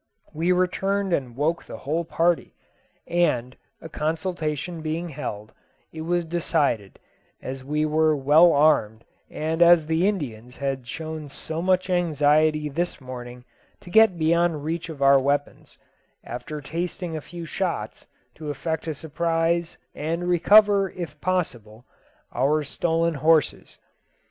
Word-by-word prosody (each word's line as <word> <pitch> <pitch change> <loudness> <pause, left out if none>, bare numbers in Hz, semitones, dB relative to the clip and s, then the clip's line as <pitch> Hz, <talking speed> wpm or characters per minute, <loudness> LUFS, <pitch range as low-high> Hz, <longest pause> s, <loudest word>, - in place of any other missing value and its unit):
We 165 +4 0
returned 190 +1 0
and 125 -6 -2
woke 155 +5 0
the - - -8
whole 155 +5 -2
party; 170 +1 0 0.5
and, 130 -8 0 0.3
a - - -8
consultation 160 0 -3
being 160 +2 -3
held, 110 -8 -6 0.4
it 160 - -6
was 175 +1 0
decided, 155 - -1 0.4
as 130 0 -7
we 150 +3 0
were 155 0 +2
well 150 +5 +5
armed, 130 -8 +2 0.3
and 160 +2 -3
as 170 -2 +7
the 160 +4 +1
Indians 125 - -4
had 135 -3 -3
shown 155 +1 -6
so 160 +3 -5
much 185 0 +1
anxiety 155 -3 +2
this 170 +5 -3
morning 125 -2 -9 0.4
to 175 - -12
get 220 -4 +5
beyond 165 -1 +1
reach 165 +2 -3
of 145 -4 -4
our 135 0 +6
weapons, 145 +1 -2 0.5
after 150 +5 -7
tasting 170 +3 -4
a 155 - -4
few 170 +5 -9
shots, 165 - -4 0.3
to 155 -1 -8
effect 160 +3 -3
a 160 - -2
surprise, 165 +2 -1 0.2
and 165 +4 -3
recover, 200 +2 +5
if 155 -5 -8
possible, 120 - -3 0.5
our 145 +5 +1
stolen 165 +3 0
horses. 155 +1 +1
160 Hz, 135 wpm, -24 LUFS, 145-170 Hz, 0.5 s, as